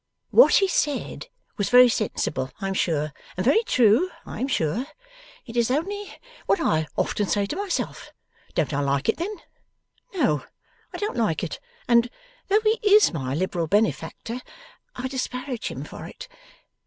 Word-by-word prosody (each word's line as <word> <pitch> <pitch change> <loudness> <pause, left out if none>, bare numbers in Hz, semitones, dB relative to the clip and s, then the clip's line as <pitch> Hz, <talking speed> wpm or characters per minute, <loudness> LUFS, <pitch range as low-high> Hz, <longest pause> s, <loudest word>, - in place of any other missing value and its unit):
'What - - +7
he 390 - +4
said 295 -6 -1 0.3
was 200 -2 0
very 250 0 +8
sensible, 150 - -1
I 195 - -3
am 195 - -1
sure, 155 -5 0 0.2
and 185 - -1
very 285 - +5
true, 245 - +4 0.2
I - - -7
am 260 - 0
sure. 230 - -1 0.6
It 230 - -10
is 235 -1 +2
only 395 +9 -2 0.4
what - - +3
I 160 - +1
often 205 - 0
say 200 +1 +1
to 200 - -4
myself. 395 -1 -3 0.4
Don't 155 -2 0
I 140 - 0
like 140 +5 0
it - - +2
then? 395 +6 -3 0.8
No, 230 - +1 0.5
I - - -6
don't 420 +2 -3
like - - 0
it, - - -4 0.3
and, 235 0 +4 0.4
though 420 +2 +3
he 435 +1 +2
is 420 - +5
my 135 -4 -2
liberal 175 -1 -1
benefactor, 225 +4 -1 0.5
I 260 - -3
disparage 255 -1 -4
him - - -5
for - - -9
it. - - -10
240 Hz, 165 wpm, -24 LUFS, -, 0.8 s, very